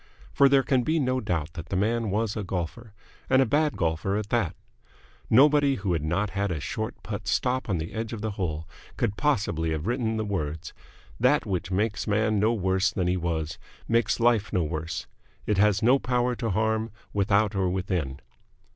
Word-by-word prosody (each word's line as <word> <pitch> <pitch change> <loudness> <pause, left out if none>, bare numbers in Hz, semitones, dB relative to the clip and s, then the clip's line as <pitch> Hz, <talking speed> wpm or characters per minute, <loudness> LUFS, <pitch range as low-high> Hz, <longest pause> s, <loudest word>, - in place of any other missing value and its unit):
For 140 -1 +5
there 135 -1 +4
can 130 -2 +2
be 160 +6 +1
no 130 -2 +1
doubt 85 -6 -2
that 85 -2 -8
the - - -2
man 110 +3 +1
was 105 +1 -1
a 105 - -3
golfer, 95 +5 -4 0.4
and 130 - +5
a 135 - +5
bad 150 +5 +1
golfer 85 +4 0
at 105 -1 -4
that. 115 -8 0 0.7
Nobody 140 +2 +5
who 95 -6 -1
had 80 - 0
not 95 +6 0
had 100 +1 -1
a 85 -3 -2
short 110 +9 -4
putt 100 -2 -5
stop 125 +3 0
on 95 - +1
the 80 +1 -5
edge 110 0 -3
of 115 -3 -5
the 110 - -1
hole 80 -6 -3 0.3
could 100 - 0
possibly 100 - 0
have 80 +1 -3
written 115 -1 0
the 110 - -1
words: 80 -6 -3 0.5
"That 125 +5 +3
which 95 -4 -2
makes 105 +3 0
the - - -2
man 110 -1 +2
no 110 +3 +3
worse 95 -2 +1
than 95 -1 -2
he 90 - +2
was 80 -3 -2 0.3
makes 115 +1 +2
life 115 -3 +2
no 90 - +1
worse. 80 0 -4 0.4
It 105 -2 +1
has 105 0 +3
no 130 +4 +5
power 125 -1 0
to 115 -2 -2
harm, 110 +2 0 0.2
without 100 +1 +2
or 95 -2 +1
within." 90 -7 -2
105 Hz, 200 wpm, -26 LUFS, 90-115 Hz, 0.7 s, For